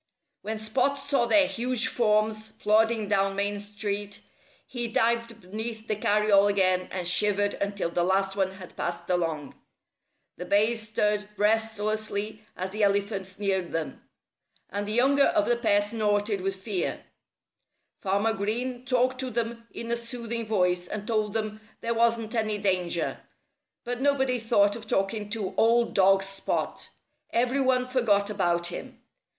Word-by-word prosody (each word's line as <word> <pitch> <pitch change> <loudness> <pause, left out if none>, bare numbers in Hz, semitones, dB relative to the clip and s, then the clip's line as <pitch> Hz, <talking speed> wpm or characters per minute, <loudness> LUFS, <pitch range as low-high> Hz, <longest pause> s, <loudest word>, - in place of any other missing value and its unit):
When 220 +1 -4
Spot 250 +6 0
saw 275 -3 +1
their 290 +4 +5
huge 250 -1 0
forms 215 -2 +1
plodding 220 +1 +2
down 195 -1 +1
Main 205 +1 -1
Street 205 0 -4 0.4
he 240 -2 -3
dived 230 0 0
beneath 220 +4 -5
the 215 - 0
carryall 210 -1 +3
again 185 -2 +2
and 180 -2 -3
shivered 205 +2 +3
until 200 -4 -2
the 175 - +1
last 195 +1 +1
one 190 -1 0
had 190 -2 -12
passed 175 0 -3
along. 165 -5 -1 0.8
The 180 - -6
bays 215 +2 +2
stirred 210 -1 0
restlessly 215 0 -1
as 185 +1 -4
the 215 +2 -4
elephants 200 -1 0
neared 190 -3 -1
them. 165 -1 -3 0.7
And 205 +1 -3
the - - -2
younger 275 +4 +4
of 325 -3 +2
the 240 - +2
pair 210 -4 +2
snorted 205 -2 0
with 195 +1 -2
fear. 190 -1 -3 0.9
Farmer 200 +3 +1
Green 240 +5 -2
talked 255 0 +1
to 260 -1 -3
them 230 0 -3
in 235 0 -6
a - - +3
soothing 235 -1 -3
voice 180 -4 +1
and 210 +1 -5
told 215 -2 0
them 215 -1 -3 0.2
there 230 0 -1
wasn't 230 -1 +1
any 215 -2 0
danger. 180 -4 -1 0.6
But 245 +1 -4
nobody 265 -3 +2
thought 205 -3 +3
of 225 -2 -9
talking 205 +1 -1
to 205 -4 -3
old 235 +1 +3
dog 195 0 +4
Spot. 195 0 -3 0.4
Every 250 +3 +1
one 255 -1 +2
forgot 210 -5 +2
about 175 -4 +1
him. 175 - -6
210 Hz, 150 wpm, -27 LUFS, 195-230 Hz, 0.9 s, their